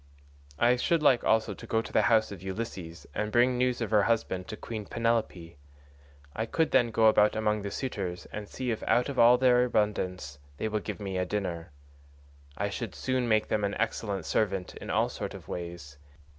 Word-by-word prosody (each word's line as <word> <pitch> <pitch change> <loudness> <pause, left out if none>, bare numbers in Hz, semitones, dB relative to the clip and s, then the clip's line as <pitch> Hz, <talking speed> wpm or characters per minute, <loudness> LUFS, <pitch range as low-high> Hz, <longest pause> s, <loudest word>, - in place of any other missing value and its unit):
I 120 +6 +4
should 160 +5 +1
like 130 -4 +4
also 110 0 +2
to 115 - -11
go 110 - +1
to 115 - -6
the - - +4
house 110 -2 +3
of 100 - -8
Ulysses 95 -4 -6
and 105 0 -2
bring 125 +2 +4
news 125 0 0
of 115 - -2
her 105 -2 +5
husband 100 -4 0
to 110 - -6
Queen 110 -3 -6
Penelope. 115 -8 -1 0.8
I 110 - -1
could 160 +7 0
then 120 - +4
go 115 0 +2
about 105 -1 +5
among 105 -1 0
the 100 - -4
suitors 95 -7 -4
and 105 -1 -6
see 130 -2 -3
if 110 - -3
out 125 +3 +3
of 140 - -3
all 120 +1 +7
their 125 -1 +4
abundance 90 - -1 0.2
they 110 - -2
will 105 0 -1
give - - -6
me 95 -3 -3
a 90 - 0
dinner. 90 -5 -3 0.9
I 100 - 0
should 110 -2 -5
soon 130 -2 -1
make 110 -1 +3
them 105 - 0
an 100 0 -1
excellent 100 -5 -2
servant 95 -4 -1
in - - -9
all - - +2
sorts - - -6
of - - -11
ways. 85 -5 -7
110 Hz, 200 wpm, -29 LUFS, 95-120 Hz, 0.9 s, all